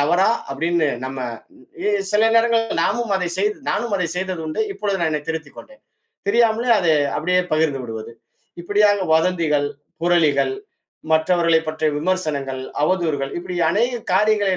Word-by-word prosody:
தவறா 175 Hz, +8 st, +3 dB, 0.2 s
அப்டின்னு 165 Hz, +1 st, +1 dB, 0.2 s
நம்ம 135 Hz, 0 st, -5 dB, 0.7 s
எ 210 Hz, -, +3 dB, 0.2 s
சில 220 Hz, +2 st, +4 dB
நேரங்கள்ல 230 Hz, -2 st, +2 dB
நாமும் 235 Hz, 0 st, 0 dB
அதை 180 Hz, -2 st, -2 dB
செய்து 210 Hz, +2 st, +1 dB
நானும் 230 Hz, -1 st, -1 dB
அதைச் 180 Hz, -2 st, -2 dB
செய்தது 185 Hz, -2 st, -3 dB
உண்டு. 155 Hz, +8 st, -1 dB
இப்பொழுது 200 Hz, -1 st, -1 dB
நான் 160 Hz, -2 st, +1 dB
என்னை 150 Hz, -, -2 dB
திருத்திக் 160 Hz, -3 st, -5 dB
கொண்டேன். 270 Hz, +1 st, -14 dB, 0.5 s
தெரியாமலே 230 Hz, +2 st, +2 dB
அத 175 Hz, -, 0 dB, 0.3 s
அப்டியே 180 Hz, +3 st, +2 dB
பகிர்ந்து 155 Hz, -4 st, +1 dB
விடுவது. 115 Hz, 0 st, -7 dB, 0.5 s
இப்படியாக 205 Hz, 0 st, +2 dB
வதந்திகள், 160 Hz, -4 st, +1 dB, 0.3 s
புரளிகள், 175 Hz, -, +2 dB, 0.6 s
மற்றவர்களைப் 165 Hz, 0 st, +3 dB
பற்றிய 155 Hz, -1 st, 0 dB
விமர்சனங்கள், 150 Hz, -7 st, -2 dB, 0.2 s
அவதூறுகள் 155 Hz, -6 st, -1 dB
இப்படி 180 Hz, 0 st, -6 dB
அநேக 240 Hz, +3 st, 0 dB
காரியங்களை 205 Hz, -2 st, +2 dB
180 Hz, 135 wpm, -21 LUFS, 155-210 Hz, 0.7 s, சில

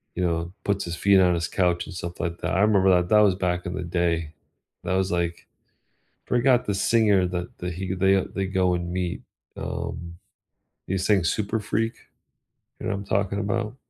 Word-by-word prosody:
you 90 Hz, -, 0 dB
know, 85 Hz, 0 st, -1 dB
puts 100 Hz, -1 st, 0 dB
his 85 Hz, 0 st, -4 dB
feet 100 Hz, +2 st, +4 dB
on 90 Hz, -1 st, +4 dB
his 85 Hz, 0 st, -1 dB
couch 90 Hz, -2 st, +1 dB
and -, -, -9 dB
stuff 85 Hz, 0 st, -6 dB
like 85 Hz, 0 st, -3 dB
that. -, -, -2 dB
I 95 Hz, -, +3 dB
remember 100 Hz, -2 st, +4 dB
that 90 Hz, -1 st, +3 dB
that 105 Hz, -, +6 dB
was 100 Hz, -3 st, +5 dB
back 90 Hz, -1 st, -1 dB
in 90 Hz, -, -3 dB
the 95 Hz, -, -3 dB
day. 85 Hz, -2 st, -1 dB, 0.5 s
That 90 Hz, -, -1 dB
was 95 Hz, +1 st, 0 dB
like, 85 Hz, -1 st, -2 dB, 0.8 s
forgot 125 Hz, 0 st, +3 dB
the 100 Hz, -, 0 dB
singer 100 Hz, -2 st, +3 dB
that 90 Hz, 0 st, -5 dB
that 90 Hz, 0 st, -4 dB
he 95 Hz, +1 st, -3 dB
they, 95 Hz, +1 st, +3 dB
they 95 Hz, -1 st, -1 dB
go 95 Hz, -1 st, +1 dB
and 85 Hz, 0 st, -4 dB
meet, 90 Hz, -1 st, -2 dB, 0.4 s
um, 85 Hz, 0 st, -5 dB, 0.7 s
they 95 Hz, -, -1 dB
sing 95 Hz, -1 st, +2 dB
Super 105 Hz, +5 st, 0 dB
Freak, 115 Hz, +2 st, -1 dB, 0.9 s
you -, -, -7 dB
know -, -, 0 dB
what 100 Hz, -, -2 dB
I'm 100 Hz, -, -7 dB
talking 100 Hz, 0 st, 0 dB
about? 110 Hz, +3 st, -2 dB
95 Hz, 200 wpm, -25 LUFS, 85-100 Hz, 0.9 s, that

